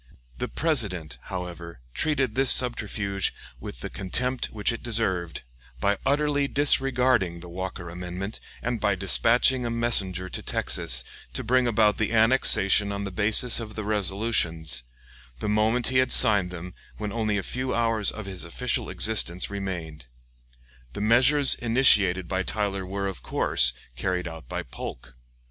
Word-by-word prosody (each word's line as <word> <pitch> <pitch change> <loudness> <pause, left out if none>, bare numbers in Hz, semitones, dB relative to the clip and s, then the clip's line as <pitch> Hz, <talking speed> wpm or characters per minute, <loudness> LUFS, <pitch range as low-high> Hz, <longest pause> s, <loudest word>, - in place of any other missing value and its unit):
The - - -2
President, 90 - 0
however, 85 -4 -7
treated 140 -7 0
this 135 +1 +2
subterfuge 100 -5 +2 0.2
with - - -9
the - - -5
contempt 125 +7 -2
which 105 +1 -1
it 115 - -6
deserved, 95 - -1 0.4
by 100 +8 0
utterly 145 0 +1
disregarding 130 -10 +1
the 90 - -11
Walker 90 0 -6
amendment, 90 +4 -6 0.2
and 120 -1 -2
by 100 - +1
dispatching 120 +7 +2
a 120 - -2
messenger 100 -6 +1
to - - -5
Texas - - 0 0.3
to - - -3
bring 125 +2 +2
about 110 -2 +2
annexation 110 -3 +4
on 100 0 -4
the 100 - -5
basis 110 +6 +4
of 110 -2 -8
the 110 - -5
resolutions, 95 - -1 0.6
the 105 - -5
moment 110 +3 +1
he 130 - 0
had 130 0 +1
signed 100 -4 +4
them, 90 0 -9 0.2
when 105 -1 -5
only 110 -2 -1
a 100 - -3
few 130 +4 -3
hours 115 -3 +1
of 110 -1 -6
his 95 -2 -6
official 85 -1 -3
existence 100 -5 +1
remained. 85 -9 -6 0.9
The - - -6
measures 130 +6 +5
initiated 105 -7 +3
by 95 -1 -1
Tyler 100 -1 -2
were, 100 +1 -4
of 95 -2 -5
course, 60 0 +3 0.2
carried 90 +7 -2
out 80 -7 -10
by - - -4
Polk. 60 +1 -9
100 Hz, 150 wpm, -25 LUFS, 90-120 Hz, 0.9 s, measures